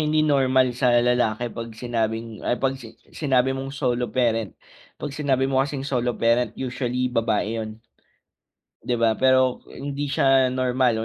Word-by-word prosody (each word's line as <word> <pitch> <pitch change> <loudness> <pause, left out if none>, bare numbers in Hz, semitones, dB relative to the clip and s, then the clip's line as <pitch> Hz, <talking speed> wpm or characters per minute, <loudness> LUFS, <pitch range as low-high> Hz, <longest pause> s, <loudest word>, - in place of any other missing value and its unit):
hindi 155 0 +2
normal 130 -3 +3
sa 125 -1 +2
lalaki 120 -1 0
'pag 115 0 -6
sinabing 115 -2 -3
ay 120 - 0
'pag 135 0 0
si 115 -1 -12 0.2
sinabi 130 -3 +1
mong 135 0 -5
solo 125 -3 -1
parent, 115 -3 0 0.4
'pag 145 - -6
sinabi 135 -3 0
mo 135 0 +2
kasing 135 -1 -2
solo 125 -3 -1
parent 115 0 +1
usually 125 -1 -2
babae 115 -1 0
'yon. 110 0 -5 1.1
'Di 120 - -1
ba 115 -1 +3
pero 130 -1 +3
hindi 140 +1 -5
siya 135 -1 +3
normal, 125 -3 +1
125 Hz, 150 wpm, -23 LUFS, 115-135 Hz, 1.1 s, normal